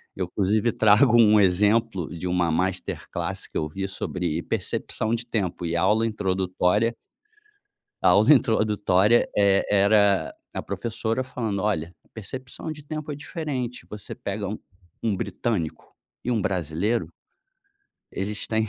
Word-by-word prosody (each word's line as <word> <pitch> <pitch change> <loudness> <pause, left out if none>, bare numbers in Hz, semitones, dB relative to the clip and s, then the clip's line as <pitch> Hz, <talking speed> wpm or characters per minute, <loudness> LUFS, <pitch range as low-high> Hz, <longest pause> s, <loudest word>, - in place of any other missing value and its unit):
Eu 95 - -2
inclusive 105 +5 +1
trago 110 +3 +5
um 105 -1 +6
exemplo 100 0 +2
de 90 - -4
uma 90 -2 +1
masterclasse 95 +3 -3
que - - -4
eu 75 - -1
vi 95 +4 -4
sobre 90 -4 -3
percepção 110 +2 -1
de 120 +1 -5
tempo 95 -7 -2
e 85 0 -1
aula 105 +5 +3
introdutória 95 +1 0 1.1
A - - +5
aula 105 +10 +6
introdutória 105 -3 +3
é 100 -1 +4
era 100 -1 +3 0.2
a - - -3
professora 115 +1 -2
falando: 115 -6 -3
"Olha, 85 -5 -1 0.2
percepção 130 +7 -6
de 150 -1 -8
tempo 155 0 -5
é - - -4
diferente. 140 -5 -5
Você 105 -1 -7
pega 100 0 -4
um 105 - -5 0.4
um 110 -3 +1
britânico 95 -4 -3 0.3
e 125 - 0
um 110 -4 +1
brasileiro" 90 +5 -1 1.1
"eles 105 +2 -3
têm, 110 -1 0
105 Hz, 135 wpm, -25 LUFS, 95-115 Hz, 1.1 s, um